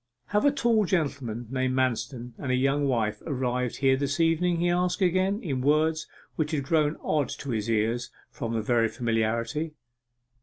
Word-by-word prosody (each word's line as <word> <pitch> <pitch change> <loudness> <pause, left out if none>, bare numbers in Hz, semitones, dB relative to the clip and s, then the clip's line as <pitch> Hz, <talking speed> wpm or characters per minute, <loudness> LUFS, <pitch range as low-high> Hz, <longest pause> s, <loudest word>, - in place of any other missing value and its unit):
'Have 210 +5 +2
a 285 - +6
tall 235 -6 +2
gentleman 140 - -1
named 130 -1 0
Manston, 125 -1 -1
and 130 - -2
a - - +3
young 140 +2 +2
wife 115 -5 0
arrived 125 -3 -1
here 135 -1 +3
this 140 +2 -2
evening?' 165 +1 +2
he 175 - +2
asked 180 +1 +1
again, 185 +2 +2
in 135 -8 -2
words 155 +3 +2 0.3
which 155 -2 0
had 150 -4 -1
grown 150 +1 +1
odd 150 -3 +1
to 140 - -5
his 110 -1 -2
ears 115 +2 0 0.2
from 115 0 -3
very 115 0 +3
familiarity. 115 +6 -1
135 Hz, 165 wpm, -27 LUFS, 120-160 Hz, 0.3 s, a